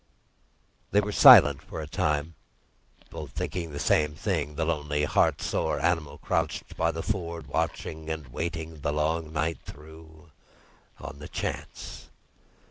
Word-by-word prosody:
They 105 Hz, -, +3 dB
were 105 Hz, 0 st, -1 dB
silent 70 Hz, -7 st, +8 dB
for -, -, -8 dB
a 80 Hz, -, -4 dB
time, 75 Hz, -1 st, -1 dB, 0.8 s
both 75 Hz, -5 st, -8 dB
thinking 90 Hz, +2 st, -3 dB
of 75 Hz, -, -11 dB
the 70 Hz, -, -5 dB
same 75 Hz, 0 st, +2 dB
thing—the 80 Hz, -3 st, -2 dB
lonely, 75 Hz, -2 st, -1 dB
heart 75 Hz, -, +2 dB
sore -, -, -1 dB
animal, 80 Hz, -4 st, 0 dB
crouched -, -, -2 dB
by 80 Hz, -, +1 dB
the 80 Hz, 0 st, -3 dB
ford, 85 Hz, -6 st, -3 dB
watching 80 Hz, +1 st, -3 dB
and 80 Hz, -3 st, -4 dB
waiting, 80 Hz, +3 st, -5 dB
the 75 Hz, -, -1 dB
long 80 Hz, +1 st, -1 dB
night 80 Hz, +1 st, -1 dB
through—on 80 Hz, -1 st, -14 dB
the 75 Hz, -, -8 dB
chance. -, -, -6 dB
80 Hz, 135 wpm, -27 LUFS, 75-85 Hz, 0.8 s, silent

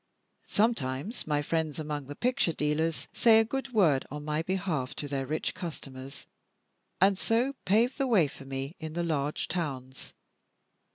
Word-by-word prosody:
Sometimes 205 Hz, -, 0 dB
my 145 Hz, -1 st, +1 dB
friends 160 Hz, -1 st, -1 dB
among 150 Hz, -3 st, -4 dB
the 145 Hz, -, -6 dB
picture 245 Hz, -, +1 dB
dealers 150 Hz, +2 st, 0 dB
say 225 Hz, -2 st, +6 dB
a 225 Hz, -, +4 dB
good 270 Hz, +3 st, -3 dB
word 165 Hz, -, +4 dB
on 150 Hz, +1 st, -6 dB
my 150 Hz, +1 st, 0 dB
behalf 175 Hz, -7 st, -1 dB
to 145 Hz, -, -4 dB
their 135 Hz, -2 st, -2 dB
rich 155 Hz, +3 st, -1 dB
customers, 140 Hz, -7 st, -7 dB, 0.7 s
and 195 Hz, +1 st, +4 dB
so 240 Hz, +4 st, +2 dB
pave 230 Hz, +7 st, +3 dB
the 275 Hz, -1 st, +1 dB
way 210 Hz, -10 st, +5 dB
for 135 Hz, 0 st, -11 dB
me 135 Hz, +4 st, -4 dB
in 160 Hz, -1 st, -5 dB
the 175 Hz, +1 st, -1 dB
large 150 Hz, -3 st, -1 dB
towns. 135 Hz, -7 st, -4 dB
160 Hz, 160 wpm, -30 LUFS, 145-200 Hz, 0.7 s, say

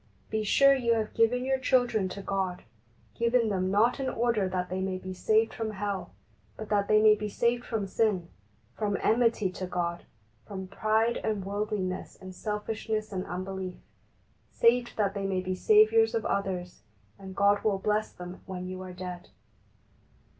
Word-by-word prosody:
Be 220 Hz, 0 st, 0 dB
sure 275 Hz, +6 st, +5 dB
you 235 Hz, -4 st, +2 dB
have 220 Hz, -1 st, -2 dB
given 245 Hz, +3 st, +2 dB
your 265 Hz, 0 st, +1 dB
children 245 Hz, -7 st, +2 dB
to 200 Hz, +1 st, -7 dB
God 190 Hz, -2 st, -2 dB, 0.3 s
— 115 Hz, +1 st, -34 dB
given 235 Hz, -1 st, +3 dB
them 185 Hz, -2 st, 0 dB
not 215 Hz, +7 st, +3 dB
in 265 Hz, -1 st, -1 dB
order 230 Hz, -6 st, 0 dB
that 180 Hz, -1 st, -2 dB
they 185 Hz, +1 st, -3 dB
may 190 Hz, -1 st, -2 dB
be 185 Hz, 0 st, -7 dB
saved 220 Hz, +4 st, +2 dB
from 225 Hz, -1 st, -3 dB
hell, 200 Hz, -, -3 dB, 0.5 s
but 220 Hz, -, -7 dB
that 205 Hz, -1 st, +1 dB
they 215 Hz, -, +5 dB
may 215 Hz, 0 st, +7 dB
be 210 Hz, 0 st, -3 dB
saved 235 Hz, +3 st, 0 dB
from 220 Hz, -5 st, -2 dB
sin, 190 Hz, -3 st, 0 dB, 0.5 s
from 205 Hz, -2 st, -1 dB
enmity 225 Hz, -4 st, +2 dB
to 185 Hz, 0 st, -5 dB
God, 170 Hz, -1 st, -3 dB, 0.4 s
from 190 Hz, -2 st, -6 dB
pride 220 Hz, +4 st, +1 dB
and 210 Hz, -3 st, -2 dB
worldliness 200 Hz, -2 st, -3 dB
and 185 Hz, 0 st, -9 dB
selfishness 215 Hz, +1 st, -3 dB
and 185 Hz, -1 st, -3 dB
unbelief, 185 Hz, +1 st, -5 dB, 0.7 s
saved 240 Hz, +1 st, +3 dB
that 200 Hz, -2 st, +1 dB
they 195 Hz, -1 st, -2 dB
may 190 Hz, -1 st, 0 dB
be 185 Hz, 0 st, -2 dB
saviours 440 Hz, -, +4 dB
of 455 Hz, -, -1 dB
others, 185 Hz, -, -2 dB, 0.4 s
and 190 Hz, -1 st, -9 dB
God 200 Hz, +1 st, +3 dB
will 210 Hz, -3 st, +2 dB
bless 210 Hz, +2 st, 0 dB
them 180 Hz, 0 st, -9 dB
when 180 Hz, -1 st, -5 dB
you 185 Hz, 0 st, -6 dB
are 185 Hz, -1 st, -8 dB
dead. 180 Hz, -1 st, -7 dB
205 Hz, 175 wpm, -28 LUFS, 185-225 Hz, 0.7 s, may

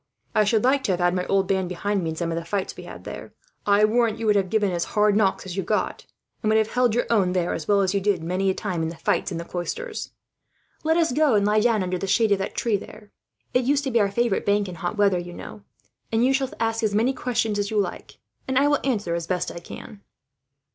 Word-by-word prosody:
I 215 Hz, -2 st, +3 dB
should 215 Hz, +1 st, +2 dB
like 265 Hz, +2 st, +3 dB
to 190 Hz, -, +2 dB
have 180 Hz, -, -2 dB
had 175 Hz, 0 st, +2 dB
my 180 Hz, 0 st, -2 dB
old 195 Hz, -1 st, +2 dB
band 190 Hz, -2 st, 0 dB
behind 195 Hz, +2 st, -1 dB
me, 165 Hz, -, -1 dB
in 160 Hz, -, -4 dB
some 170 Hz, 0 st, -2 dB
of -, -, -2 dB
the 170 Hz, -, -3 dB
fights 190 Hz, +3 st, -3 dB
we -, -, -10 dB
had -, -, -10 dB
there. -, -, -9 dB, 0.3 s
I 205 Hz, +1 st, +5 dB
warrant 225 Hz, 0 st, +2 dB
you 230 Hz, -, -4 dB
would 210 Hz, -1 st, +4 dB
have 195 Hz, -2 st, +1 dB
given 210 Hz, -2 st, +1 dB
as 170 Hz, -1 st, -1 dB
hard 210 Hz, -1 st, +4 dB
knocks 200 Hz, -3 st, +1 dB
as 180 Hz, -2 st, -6 dB
you 195 Hz, -, 0 dB
got, 210 Hz, +3 st, -2 dB, 0.3 s
and 215 Hz, -, 0 dB
would 220 Hz, -, +4 dB
have 220 Hz, 0 st, +1 dB
held 245 Hz, -3 st, +2 dB
your 245 Hz, -, +1 dB
own 190 Hz, -5 st, +3 dB
there, 180 Hz, -2 st, 0 dB
as 160 Hz, -, -5 dB
well 200 Hz, -1 st, +4 dB
as 190 Hz, 0 st, +1 dB
you 200 Hz, -, +1 dB
did 190 Hz, -4 st, +1 dB
many 185 Hz, +3 st, 0 dB
a 190 Hz, -, 0 dB
time 180 Hz, -5 st, -3 dB
in 160 Hz, -, -1 dB
the 170 Hz, -, -8 dB
fights -, -, 0 dB
in 170 Hz, -, -3 dB
the 170 Hz, -, -5 dB
Cloisters. 435 Hz, -, -5 dB, 0.7 s
"Let 320 Hz, +1 st, +2 dB
us 330 Hz, -4 st, +2 dB
go 295 Hz, -2 st, +3 dB
and 200 Hz, -1 st, +3 dB
lie 210 Hz, +1 st, +3 dB
down 220 Hz, -3 st, +2 dB
under 180 Hz, 0 st, -2 dB
the 195 Hz, -, -3 dB
shade 220 Hz, +2 st, +3 dB
of 200 Hz, -, +3 dB
that 195 Hz, -, -4 dB
tree, 225 Hz, -4 st, +1 dB
there. 205 Hz, +1 st, -12 dB, 0.4 s
It 250 Hz, -, +3 dB
used 285 Hz, +2 st, +2 dB
to 270 Hz, -, -2 dB
be 235 Hz, -, +3 dB
our 200 Hz, -, +2 dB
favourite 235 Hz, 0 st, 0 dB
bank, 205 Hz, 0 st, +2 dB
you 185 Hz, -, -6 dB
know, 170 Hz, -, -11 dB
in -, -, -12 dB
hot 175 Hz, +4 st, -3 dB
weather; 195 Hz, -4 st, +3 dB, 0.9 s
and 225 Hz, +2 st, +3 dB
you 265 Hz, -, +3 dB
shall 270 Hz, -1 st, 0 dB
ask 225 Hz, 0 st, 0 dB
as 210 Hz, -2 st, 0 dB
many 235 Hz, +5 st, +2 dB
questions 225 Hz, -5 st, -1 dB
as 200 Hz, 0 st, -1 dB
you 220 Hz, -, -2 dB
like, 195 Hz, -3 st, -4 dB, 0.3 s
and 260 Hz, -1 st, 0 dB
I 280 Hz, +2 st, +4 dB
will 290 Hz, 0 st, +3 dB
answer 210 Hz, -10 st, -1 dB
as 170 Hz, -1 st, -3 dB
best 180 Hz, -1 st, -1 dB
I -, -, -7 dB
can." 200 Hz, +4 st, -11 dB
205 Hz, 275 wpm, -24 LUFS, 185-230 Hz, 0.9 s, I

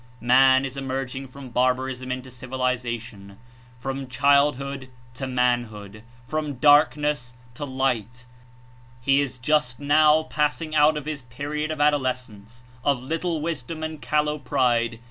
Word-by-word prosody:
Man 130 Hz, +2 st, +5 dB
Is 135 Hz, 0 st, -5 dB
emerging 135 Hz, 0 st, -4 dB
from 130 Hz, 0 st, -11 dB
barbarism 130 Hz, +1 st, 0 dB
Into 130 Hz, 0 st, -5 dB
civilization, 120 Hz, -5 st, -4 dB, 0.4 s
from 135 Hz, +1 st, -4 dB
childhood 140 Hz, 0 st, +1 dB, 0.2 s
to 135 Hz, +1 st, -5 dB
manhood, 120 Hz, -5 st, -1 dB, 0.3 s
from 155 Hz, -2 st, -3 dB
darkness 145 Hz, -2 st, +3 dB, 0.2 s
to 145 Hz, +5 st, -5 dB
light; 125 Hz, -3 st, -2 dB, 0.7 s
he 135 Hz, +2 st, +3 dB
Is 135 Hz, -2 st, -3 dB
just 125 Hz, -1 st, +1 dB
now 150 Hz, +2 st, +4 dB
passing 155 Hz, +1 st, -1 dB
out 150 Hz, 0 st, +4 dB
of 150 Hz, -, -6 dB
his 150 Hz, -2 st, -4 dB
period 145 Hz, +5 st, -4 dB
of 155 Hz, -1 st, -4 dB
adolescense, 125 Hz, -6 st, -1 dB, 0.2 s
of 135 Hz, -3 st, +1 dB
little 165 Hz, +3 st, -2 dB
wisdom 155 Hz, 0 st, -4 dB
and 155 Hz, -2 st, -5 dB
callow 150 Hz, 0 st, 0 dB
pride. 120 Hz, -4 st, +1 dB
130 Hz, 125 wpm, -24 LUFS, 125-150 Hz, 0.7 s, Man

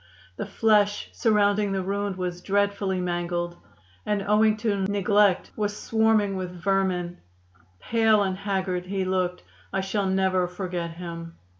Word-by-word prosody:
The -, -, -5 dB
flesh 210 Hz, -2 st, +2 dB
surrounding 205 Hz, -2 st, +2 dB
the 190 Hz, -1 st, -1 dB
wound 200 Hz, +1 st, -2 dB
was 180 Hz, -1 st, -4 dB
dreadfully 200 Hz, -1 st, 0 dB
mangled, 175 Hz, -1 st, -2 dB, 0.5 s
and 210 Hz, -1 st, -1 dB
owing 215 Hz, +1 st, +3 dB
to 210 Hz, -3 st, 0 dB
neglect 205 Hz, -1 st, +2 dB
was 210 Hz, -1 st, -2 dB
swarming 220 Hz, -3 st, +2 dB
with 185 Hz, -1 st, -3 dB
vermin. 180 Hz, -1 st, -1 dB, 0.6 s
Pale 220 Hz, -2 st, +3 dB
and 190 Hz, -1 st, -1 dB
haggard 190 Hz, -2 st, -2 dB
he 190 Hz, 0 st, -1 dB
looked. 185 Hz, -1 st, -1 dB, 0.3 s
I 195 Hz, -, 0 dB
shall 195 Hz, +1 st, -1 dB
never 190 Hz, -1 st, +2 dB
forget 180 Hz, -2 st, -4 dB
him. 170 Hz, -1 st, -8 dB
195 Hz, 135 wpm, -25 LUFS, 180-205 Hz, 0.6 s, owing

